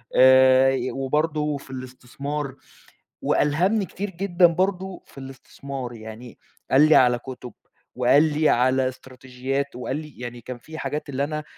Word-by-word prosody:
آآ 130 0 +6
ي 130 -1 -2
وبرضه 150 +2 -1
في 135 - -13
الاستثمار. 130 +2 -6 0.7
وألهمني 185 +8 +1
كتير 200 +4 -5
جدًا 180 -1 +3
برضه 185 +2 -2
في - - -16
الاستثمار. 135 -1 -8
يعني 110 +2 -11 0.3
قال 145 +4 +6
لي 155 - +6
على 125 -1 +4
كُتب 125 -2 -9 0.4
وقال 130 +4 +4
لي 155 0 +2
على 130 +1 +2
إستراتيجيات 130 +1 -5
وقال 130 +2 -3
لي 150 -3 -9
يعني 120 -1 -7
كان 125 +1 -8
في 160 +6 -11
حاجات 150 0 -4
اللي 140 0 -1
أنا 155 0 -4
135 Hz, 145 wpm, -23 LUFS, 130-150 Hz, 0.7 s, آآ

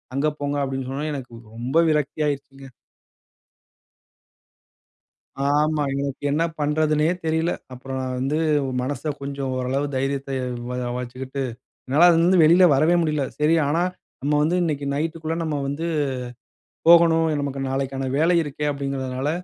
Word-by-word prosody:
அங்க 140 +3 +1
போங்க 145 0 -1
அப்பிடின்னு 135 -1 -3
சொன்னவுடன 150 +3 -3
எனக்கு 125 -3 -8 0.2
ரொம்ப 130 +8 +2
விரக்தி 150 0 0
ஆயிருச்சுங்க. 135 -1 -5 2.8
ஆமா. 150 +1 +2 0.2
எனக்கு 140 0 -4
என்ன 160 +3 +2 0.2
பண்றதுன்னே 150 +1 +2 0.2
தெரியல. 160 +2 +1 0.2
அப்புறம் 130 +1 -6
நான் 130 0 -3
வந்து 135 +4 0 0.4
மனச 140 +3 -4 0.2
கொஞ்சம் 140 -1 -4
ஓரளவு 130 +3 -1
தைரியத்த 135 +1 -2 0.4
வரவளைச்சுக்கிட்டு 125 +2 -4 0.4
என்னால 150 +7 +5
அதுலருந்து 170 +2 +4
வெளியில் 175 +2 +6
வரவே 155 +6 +3
முடியல. 150 -3 0
சரி, 150 +2 +3
ஆனா 165 +4 +1 0.4
நம்ம 145 +2 0
வந்து 170 +4 +1
இன்னக்கி 145 -4 -2
நைட்டுக்குள்ள 160 +1 -2
நம்ம 155 -2 -2
வந்து 145 +4 -3 1.0
போகணும். 165 -1 +6
நமக்கு 140 -1 -3
நாளைக்கான 135 0 -2
வேலை 165 +5 +3
இருக்கே 150 -1 -4
அப்பிடிங்கிறதுனால, 135 -1 -3
145 Hz, 125 wpm, -23 LUFS, 135-155 Hz, 2.8 s, வெளியில்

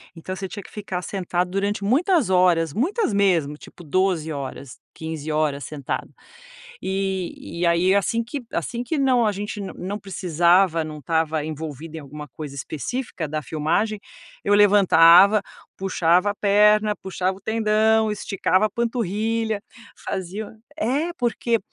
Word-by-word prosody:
então 185 +3 -6
você 190 0 -5
tinha 205 +2 -7
que - - -15
ficar 195 -4 -5
sentado 180 -1 -2
durante 200 +1 -1
muitas 300 - +2
horas, 175 -4 +3
muitas 335 - 0
mesmo, 170 -7 +2
tipo 175 - -14
12 165 0 0
horas, 140 -2 -7 0.2
15 160 -1 -5
horas 150 -2 0
sentado. 140 0 -5 0.7
E 190 -3 -3
e 175 - +2
aí 170 +3 +3
assim 230 +4 +1 0.3
assim 240 0 -3
que 315 - -2
não, 255 -4 +3
a 210 - +2
gente 205 +1 -5
não 195 0 -5
precisava, 175 -2 +2
não 155 -1 -7
estava 160 +1 0
envolvido 155 0 -6
em - - -6
alguma 150 +1 -9
coisa 145 +1 -8
específica 160 - -4
da 155 +1 -3
filmagem, 165 - -1 0.4
eu 205 - +3
levantava, 200 -1 +6 0.3
puxava 185 0 +2
a - - -3
perna, 210 +1 +3
puxava 190 0 -2
o - - -23
tendão, 220 0 +2
esticava 195 0 +1
a - - -5
panturrilha, 225 -1 -1 0.4
fazia 200 +4 -5 0.2
É, 300 +6 0
porque 235 -3 0
190 Hz, 140 wpm, -23 LUFS, 160-215 Hz, 0.7 s, levantava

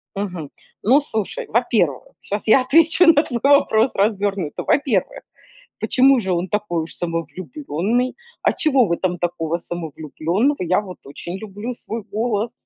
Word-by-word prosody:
Мгм. 180 -7 -5 0.3
Ну, 260 +8 +5
слушай, 220 -8 -3
во-первых, 215 - +1 0.2
щас 205 +1 -5
я 240 +4 +5
отвечу 325 +6 +5
на 295 -1 +3
твой 240 -6 -3
вопрос 270 -4 +4
развернуто. 200 -5 -1
Во-первых, 260 -10 0 0.6
почему 265 0 +4
же 190 -4 -2
он 175 +1 -1
такой 195 -5 -2
уж 160 - -8
самовлюбленный? 170 - -3 0.3
А - - +4
чего 275 -6 +3
в 180 - -4
этом 175 +1 -1
такого 170 -1 -2
самовлюбленного? 170 - -2
Я 185 +2 +1
вот 185 -3 -10
очень 170 +6 -7
люблю 215 +4 -6
свой 230 -1 -6
голос. 220 +2 -2
205 Hz, 140 wpm, -20 LUFS, 175-245 Hz, 0.6 s, Ну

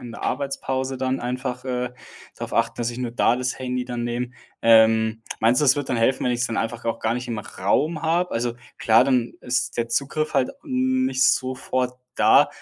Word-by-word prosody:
in 120 -2 -9
der - - -9
Arbeitspause 135 -1 -2
dann 130 +1 -1
einfach, 125 +1 -4
äh, 125 -1 -2 0.4
darauf - - -6
achten, - - +1
dass 120 0 -1
ich 120 - -8
nur 125 -2 -3
da 120 0 +2
das 130 0 -2
Handy 125 -1 -2
dann 120 -1 -4
nehme. 120 +1 -2 0.3
Ähm, 110 0 +5 0.2
meinst 120 +5 +4
du, - - +3
das 135 +1 +5
wird 145 -2 -3
dann 125 - +1
helfen, 130 +3 +2
wenn 125 - +2
ich 120 - -2
es 120 - +2
dann 115 - -4
einfach 115 +1 -3
auch 115 - -1
gar 110 - 0
nicht 125 0 -4
im 115 - -3
Raum 140 - -1
habe? 170 +3 +1
Also 120 +1 -1 0.2
klar, 115 +2 +5
dann 125 -3 +1
ist 125 +1 -1
der 115 -1 -1
Zugriff 145 +5 -1
halt, 135 -3 +2
hm, 260 -2 0
nicht 265 0 0
sofort 130 -1 0 0.2
da. - - +5
125 Hz, 215 wpm, -23 LUFS, 120-135 Hz, 0.4 s, Ähm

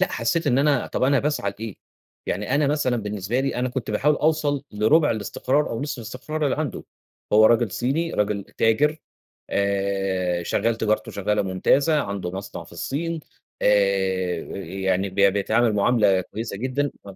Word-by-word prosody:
لأ 190 - +1
حسيت 170 -3 0
إن 130 -2 +3
أنا 140 -2 +2
طَب - - -3
أنا 140 +2 +4
باسعى 145 -9 -1
لإيه؟ 110 -3 -6 0.5
يعني 105 +8 -1
أنا 145 +1 +3
مثلًا 140 -4 +1
بالنسبة 105 +2 -2
لي 135 0 -1
أنا 125 +1 0
كنت 125 -3 -4
باحاول 145 +8 +2
أوصل 150 -3 +1
لرُبع 110 +10 +3
الاستقرار 130 +6 0
أو 115 - -3
نصف 145 -3 -4
الاستقرار 125 +7 -4
اللي 140 - +1
عنده، 150 -4 -3 0.5
هو 110 +1 +7
راجل 115 -1 +3
صيني 155 +7 -1
راجل 105 -1 0
تاجر 145 +8 +1 0.5
آآ، 95 -3 0
شغال 115 +6 0
تجارته 110 -1 0
شغالة 105 +1 0
ممتازة، 140 - +2
عنده 100 -3 -4
مصنع 95 +2 -7
في - - -17
الصين 165 +4 -3 0.4
آآ، 95 -3 +2 0.2
يعني 95 +1 -1
ب 95 - -14
بيتعامل 105 +4 +3
معاملة 105 -2 +3
كويسة 110 +2 -6
جدًا، 130 +5 -1
ما 100 -1 -10
110 Hz, 160 wpm, -23 LUFS, 100-140 Hz, 0.5 s, هو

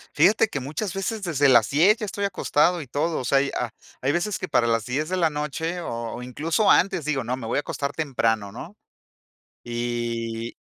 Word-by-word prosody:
Fíjate 195 +8 +5
que 145 -9 -4
muchas 155 +9 -4
veces 200 +2 -3
desde 145 -5 +3
las 120 -3 +5
10 180 +10 +5
ya 215 - -4
estoy 200 0 -4
acostado 175 -3 +2
y 140 - -9
todo, 155 +6 -1
o 125 - -4
sea, 135 +1 +4
y 140 - -2
ha 120 -3 -2 0.3
hay 135 +3 +1
veces 190 +4 -1
que 185 - -4
para 120 - +2
las 115 -2 +1
10 150 +6 -2
de 185 - -1
la 165 -3 +3
noche 155 +4 -3
o 115 -5 -4
o 125 - -7
incluso 160 - +1
antes, 180 -4 +3
digo: 140 -4 -1
"No, 125 +2 -1
me 125 -3 -7
voy - - 0
a - - +3
acostar 140 -1 -3
temprano", 115 -9 -1
¿no? 170 - -9 0.9
Y 120 -1 -3
145 Hz, 215 wpm, -24 LUFS, 120-175 Hz, 0.9 s, Fíjate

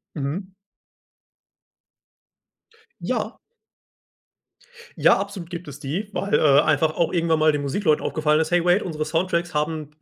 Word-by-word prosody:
Mhm. 170 +7 -4 2.5
Ja. - - -3 1.6
Ja, - - +4
absolut 195 -3 -6
gibt 175 0 -7
es 145 -1 -10
die, 170 +10 -4
weil, 200 - -2
äh, 145 -2 +5
einfach 155 +1 +1
auch 170 - 0
irgendwann 165 -2 +1
mal 155 0 +5
den 145 -1 -1
Musikleuten 150 +2 0
aufgefallen 155 -1 +1
ist: 160 +1 -2
„Hey 175 -1 +3
wait, 180 +4 +3
unsere 155 -4 -3
Soundtracks 175 +1 -1
haben 150 0 -2
160 Hz, 130 wpm, -23 LUFS, 150-180 Hz, 2.5 s, äh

